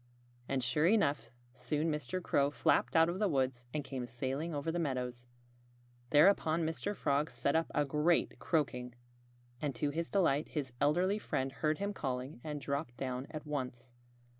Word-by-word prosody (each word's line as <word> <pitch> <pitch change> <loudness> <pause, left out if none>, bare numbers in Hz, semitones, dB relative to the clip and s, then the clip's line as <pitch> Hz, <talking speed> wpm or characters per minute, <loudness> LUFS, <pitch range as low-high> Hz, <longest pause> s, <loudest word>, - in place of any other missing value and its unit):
And 135 -2 0
sure 150 +6 +3
enough! 185 -9 +2 0.2
soon 150 +5 -1
Mr. 150 +5 -3
Crow 140 -3 +2
flapped 145 - +2
out 165 0 +6
of 175 +2 -2
the 210 - +3
woods 130 -6 0
and 150 +1 -2
came 130 -3 -5
sailing 135 +7 -3
over 150 +1 -2
the 175 - -1
meadows. 125 -5 -3 0.8
Thereupon 160 0 +4
Mr. 165 +6 -2
Frog 145 -1 +1
set 140 - 0
up 165 0 +2
a 150 - +3
great 150 +4 +2
croaking. 125 -6 -1 0.7
And 145 -4 -1
to 145 +4 0
his 165 +3 -3
delight 160 -7 +2
his 135 -5 -3
elderly 180 +8 +3
friend 135 -8 -2
heard 155 +3 0
him 200 +1 -2
calling 130 -4 -4
and 150 -2 -4
dropped 140 -2 -3
down 130 0 -3
at 155 -1 -7
once. 130 -4 -4
145 Hz, 165 wpm, -34 LUFS, 130-165 Hz, 0.8 s, out